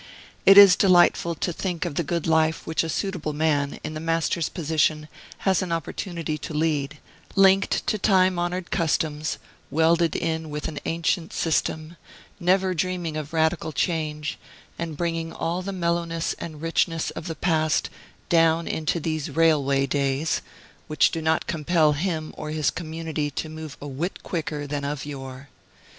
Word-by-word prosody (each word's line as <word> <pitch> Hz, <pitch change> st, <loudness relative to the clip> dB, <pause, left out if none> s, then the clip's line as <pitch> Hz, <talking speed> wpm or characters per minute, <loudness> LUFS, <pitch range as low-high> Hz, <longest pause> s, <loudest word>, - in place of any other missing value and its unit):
It 195 Hz, -, +9 dB
is 200 Hz, -3 st, +10 dB
delightful 175 Hz, -2 st, +4 dB
to 175 Hz, +3 st, -2 dB
think 180 Hz, -1 st, -3 dB
of 170 Hz, -, -3 dB
the 155 Hz, -, 0 dB
good 170 Hz, +2 st, -2 dB
life 160 Hz, 0 st, +2 dB
which 160 Hz, -, 0 dB
a 165 Hz, -, -4 dB
suitable 175 Hz, -4 st, -2 dB
man, 145 Hz, -2 st, 0 dB
in -, -, -4 dB
the 155 Hz, -, -5 dB
Master's 165 Hz, 0 st, 0 dB
position, 155 Hz, -1 st, 0 dB, 0.4 s
has 190 Hz, -4 st, +3 dB
an 185 Hz, -2 st, -3 dB
opportunity 165 Hz, -1 st, -3 dB
to 150 Hz, -, -6 dB
lead, 150 Hz, -2 st, 0 dB, 0.4 s
linked 195 Hz, 0 st, +4 dB
to 215 Hz, -, 0 dB
time 185 Hz, -2 st, +3 dB
honored 175 Hz, +1 st, -3 dB
customs, 155 Hz, -3 st, 0 dB, 0.3 s
welded 165 Hz, +1 st, +2 dB
in 160 Hz, -1 st, -2 dB
with 150 Hz, 0 st, -4 dB
an 150 Hz, -2 st, -5 dB
ancient 165 Hz, 0 st, -1 dB
system, 160 Hz, 0 st, -1 dB, 0.4 s
never 185 Hz, +1 st, +2 dB
dreaming 175 Hz, -2 st, -2 dB
of 155 Hz, 0 st, -5 dB
radical 160 Hz, 0 st, +1 dB
change, 155 Hz, -2 st, -2 dB, 0.4 s
and 165 Hz, -3 st, -4 dB
bringing 165 Hz, -1 st, -2 dB
all 170 Hz, +3 st, -2 dB
the 195 Hz, +2 st, -4 dB
mellowness 170 Hz, -2 st, -1 dB
and 155 Hz, -2 st, -7 dB
richness 165 Hz, 0 st, 0 dB
of 160 Hz, -, -7 dB
the 165 Hz, -, -4 dB
past 155 Hz, -3 st, +1 dB, 0.4 s
down 165 Hz, 0 st, +3 dB
into 160 Hz, +2 st, -1 dB
these 155 Hz, -1 st, -2 dB
railway 140 Hz, -3 st, +3 dB
days, 140 Hz, +2 st, 0 dB, 0.5 s
which 155 Hz, -2 st, +3 dB
do 165 Hz, -, -3 dB
not 160 Hz, 0 st, +1 dB
compel 155 Hz, -1 st, +2 dB
him 155 Hz, 0 st, -2 dB
or 155 Hz, -, -6 dB
his 155 Hz, -2 st, 0 dB
community 160 Hz, -3 st, -4 dB
to 155 Hz, +2 st, -5 dB
move 155 Hz, -2 st, -8 dB
a 145 Hz, -, -7 dB
whit 150 Hz, +7 st, -4 dB
quicker 155 Hz, -4 st, -3 dB
than 145 Hz, 0 st, -3 dB
of 145 Hz, 0 st, -3 dB
yore. 135 Hz, -1 st, -8 dB
160 Hz, 160 wpm, -24 LUFS, 150-170 Hz, 0.5 s, is